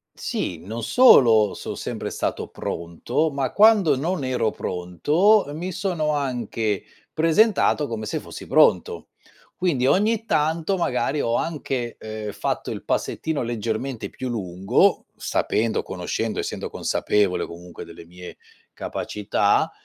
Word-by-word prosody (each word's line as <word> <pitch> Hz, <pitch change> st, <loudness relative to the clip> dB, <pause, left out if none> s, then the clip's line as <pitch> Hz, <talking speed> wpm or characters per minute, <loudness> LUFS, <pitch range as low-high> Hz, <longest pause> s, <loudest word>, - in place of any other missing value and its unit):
Sì, 85 Hz, -3 st, -3 dB
non 110 Hz, +6 st, -6 dB
solo 115 Hz, -, +6 dB
so' -, -, -6 dB
sempre -, -, -5 dB
stato -, -, -3 dB
pronto, 120 Hz, -, -2 dB
ma 135 Hz, -2 st, -2 dB
quando 205 Hz, -8 st, +5 dB
non 155 Hz, +3 st, -2 dB
ero 125 Hz, -4 st, 0 dB
pronto, 150 Hz, -, +2 dB
uhm, 145 Hz, +1 st, -6 dB
mi 180 Hz, +3 st, -4 dB
sono 180 Hz, -4 st, -1 dB
anche 120 Hz, -7 st, -2 dB, 0.3 s
presentato 165 Hz, -1 st, +3 dB
come 110 Hz, -3 st, -4 dB
se 105 Hz, -, -2 dB
fossi -, -, -10 dB
pronto. -, -, +3 dB, 0.5 s
Quindi 145 Hz, -9 st, +1 dB
ogni 215 Hz, +7 st, +2 dB
tanto 160 Hz, +3 st, 0 dB
magari 140 Hz, -3 st, 0 dB
ho 115 Hz, -, 0 dB
anche, 135 Hz, -7 st, -3 dB
ehm, 110 Hz, -1 st, -6 dB
fatto -, -, -3 dB
il -, -, -5 dB
passettino 160 Hz, -2 st, -1 dB
leggermente 115 Hz, +1 st, -3 dB
più 130 Hz, -1 st, -5 dB
lungo 95 Hz, -4 st, +1 dB
sapendo, 110 Hz, +1 st, 0 dB
conoscendo, 95 Hz, +5 st, -3 dB
essendo -, -, -4 dB
consapevole 95 Hz, -4 st, 0 dB
comunque 85 Hz, +1 st, -10 dB
delle -, -, -12 dB
mie 90 Hz, +1 st, -11 dB, 0.3 s
capacità, 105 Hz, 0 st, 0 dB
125 Hz, 125 wpm, -23 LUFS, 105-160 Hz, 0.5 s, solo